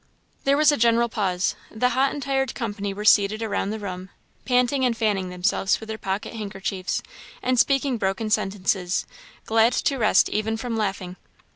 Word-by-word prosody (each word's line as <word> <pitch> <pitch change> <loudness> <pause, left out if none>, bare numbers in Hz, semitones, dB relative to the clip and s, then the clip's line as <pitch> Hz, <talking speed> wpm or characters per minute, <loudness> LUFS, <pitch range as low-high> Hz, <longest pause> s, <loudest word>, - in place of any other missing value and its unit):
There 275 +1 +4
was 305 0 +5
a 290 - 0
general 235 0 +3
pause. 190 -4 0 0.2
The 250 +3 0
hot 265 +2 +2
and 285 - -5
tired 270 -1 -1
company 205 -4 -3
were 205 +2 -6
seated 210 +1 +4
around 205 -2 -1
the 220 - -3
room, 185 -3 -6 0.4
panting 250 +1 +2
and 240 -3 +1
fanning 200 -5 0
themselves 180 +1 0
with 220 - -10
their 220 0 -5
pocket 195 +4 -3
handkerchiefs, 195 -3 -4 0.4
and 255 -1 +1
speaking 275 -2 +2
broken 195 +3 -1
sentences; 190 -3 0 0.4
glad 225 +2 +3
to 275 - 0
rest 215 -2 +4
even 220 +1 -1
from 235 0 -4
laughing. 195 -4 -3
220 Hz, 170 wpm, -24 LUFS, 195-245 Hz, 0.4 s, was